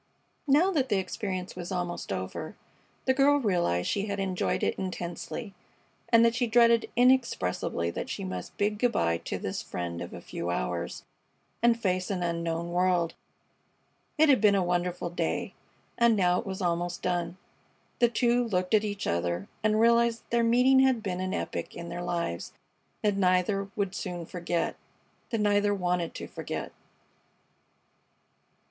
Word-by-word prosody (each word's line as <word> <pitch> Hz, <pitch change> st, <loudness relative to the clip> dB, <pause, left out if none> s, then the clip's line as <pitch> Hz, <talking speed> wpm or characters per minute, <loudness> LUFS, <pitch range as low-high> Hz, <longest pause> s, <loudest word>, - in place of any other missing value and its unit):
Now 310 Hz, +8 st, +4 dB
that 270 Hz, -7 st, 0 dB
the 205 Hz, -, +2 dB
experience 185 Hz, -1 st, -4 dB
was 180 Hz, +1 st, -6 dB
almost 175 Hz, -, -3 dB
over, 95 Hz, -1 st, -4 dB, 0.5 s
the 260 Hz, -, +4 dB
girl 280 Hz, +2 st, +4 dB
realized 175 Hz, -, +1 dB
that -, -, +1 dB
she 200 Hz, 0 st, 0 dB
had 200 Hz, -1 st, -3 dB
enjoyed 190 Hz, -2 st, -1 dB
it -, -, +2 dB
intensely, 185 Hz, +3 st, -5 dB, 0.6 s
and 230 Hz, 0 st, +6 dB
that 230 Hz, -, +3 dB
she 245 Hz, 0 st, 0 dB
dreaded 235 Hz, 0 st, +4 dB
inexpressibly 235 Hz, -, +2 dB
that -, -, -5 dB
she -, -, -4 dB
must 90 Hz, -1 st, -6 dB
bid 205 Hz, 0 st, 0 dB
good 245 Hz, 0 st, +2 dB
by 85 Hz, 0 st, +1 dB
to -, -, -4 dB
this -, -, -4 dB
friend 85 Hz, -1 st, -5 dB
of 85 Hz, -, -6 dB
a 90 Hz, -, -7 dB
few 85 Hz, 0 st, -5 dB
hours 60 Hz, -9 st, -3 dB, 0.6 s
and 235 Hz, 0 st, +4 dB
face 185 Hz, -3 st, 0 dB
an 185 Hz, -3 st, -1 dB
unknown 170 Hz, 0 st, -2 dB
world. 175 Hz, -2 st, +2 dB, 1.0 s
It 315 Hz, +1 st, +6 dB
had 265 Hz, -7 st, +5 dB
been 205 Hz, -2 st, +5 dB
a 195 Hz, -, +2 dB
wonderful 175 Hz, 0 st, -1 dB
day, 175 Hz, -, -2 dB, 0.5 s
and 235 Hz, -1 st, +5 dB
now 180 Hz, -3 st, +3 dB
it -, -, -7 dB
was 190 Hz, 0 st, -4 dB
almost 175 Hz, 0 st, -1 dB
done. 175 Hz, -1 st, -1 dB, 0.6 s
The 240 Hz, -, +5 dB
two 240 Hz, +1 st, +2 dB
looked 185 Hz, -1 st, -1 dB
at 215 Hz, -1 st, +5 dB
each 205 Hz, -1 st, -3 dB
other 85 Hz, +2 st, -1 dB
and 215 Hz, 0 st, +3 dB
realized 235 Hz, 0 st, +4 dB
that -, -, -36 dB
their 235 Hz, 0 st, +3 dB
meeting 250 Hz, +3 st, +5 dB
had 260 Hz, -4 st, +3 dB
been 185 Hz, -3 st, -2 dB
an 185 Hz, 0 st, -2 dB
epoch -, -, -4 dB
in 170 Hz, 0 st, -7 dB
their 175 Hz, -, -5 dB
lives 170 Hz, -, -3 dB, 0.5 s
that 205 Hz, -2 st, +2 dB
neither 195 Hz, +1 st, +2 dB
would 200 Hz, -3 st, -1 dB
soon 175 Hz, -4 st, -4 dB
forget 175 Hz, 0 st, -2 dB, 0.5 s
that 225 Hz, -3 st, -1 dB
neither 205 Hz, 0 st, +3 dB
wanted 180 Hz, -3 st, -1 dB
to -, -, -5 dB
forget. -, -, -5 dB
185 Hz, 165 wpm, -28 LUFS, 175-230 Hz, 1.0 s, and